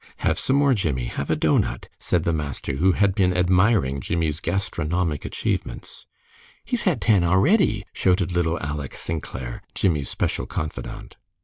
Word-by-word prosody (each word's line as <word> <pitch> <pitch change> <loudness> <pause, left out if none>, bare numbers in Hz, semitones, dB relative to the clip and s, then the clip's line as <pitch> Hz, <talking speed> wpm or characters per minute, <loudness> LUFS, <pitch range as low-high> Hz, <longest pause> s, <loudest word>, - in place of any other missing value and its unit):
"Have - - +2
some 135 - +1
more, 140 -1 +4
Jimmie. 75 - -1
Have 70 +3 -4
a 80 - +3
doughnut," 75 0 +1
said 85 -3 0
the 85 - +1
master, 70 -3 -3
who 90 +5 +4
had 100 0 +2
been 90 -2 +2
admiring 90 - +3
Jimmie's 80 0 -1
gastronomic 85 -3 -1
achievements. - - -3 0.6
"He's 245 -2 -2
had 165 - +1
ten 100 -2 +4
a'ready," 105 - +3
shouted 90 -2 +1
little 85 -1 +1
Aleck 75 -2 -4
Sinclair, 65 -6 -5
Jimmie's 75 -7 +1
special - - -2
confidant. 75 - -6
85 Hz, 145 wpm, -24 LUFS, 75-95 Hz, 0.6 s, more